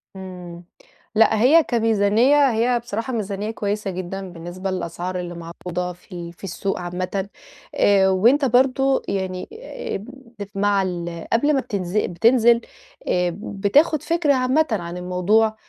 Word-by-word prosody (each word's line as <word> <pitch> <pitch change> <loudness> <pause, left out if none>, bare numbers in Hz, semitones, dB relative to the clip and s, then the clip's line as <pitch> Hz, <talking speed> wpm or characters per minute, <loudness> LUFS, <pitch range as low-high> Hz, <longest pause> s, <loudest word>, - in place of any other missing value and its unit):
إمم، 180 -2 -9 0.5
لأ 220 0 +4
هي 310 +7 +6
كميزانيّة 230 +4 +3
هي 240 +2 +1
بصراحة 235 +2 -4
ميزانيّة 210 -1 -3
كويّسة 205 -2 -3
جدًا، 185 +1 -5
بالنسبة 175 +3 -6
للأسعار 180 0 -4
اللي 175 -1 -5
معروضة 175 +1 -5
في 175 - -25
ال 170 -1 -7
في 175 - -25
السوق 195 +1 -3
عامةً 185 +2 -3 0.5
آآ، 195 -1 +4
وأنت 235 +10 +4
برضه 265 +2 +3
يعني 185 -2 -3 0.5
آمم، 195 - -6 0.5
مع 200 0 +2
ال 175 -2 -4
قبل 290 +6 +3
ما 275 - +2
بتنز 195 -5 -3
بتنزِل 230 +5 +4 0.5
آآ، 180 -1 +1
بتاخُد 225 +9 +2
فكرة 330 -4 +2
عامةً 260 +4 +2
عن 175 -4 -3
الموضوع 185 +5 +1
200 Hz, 135 wpm, -22 LUFS, 180-235 Hz, 0.5 s, هي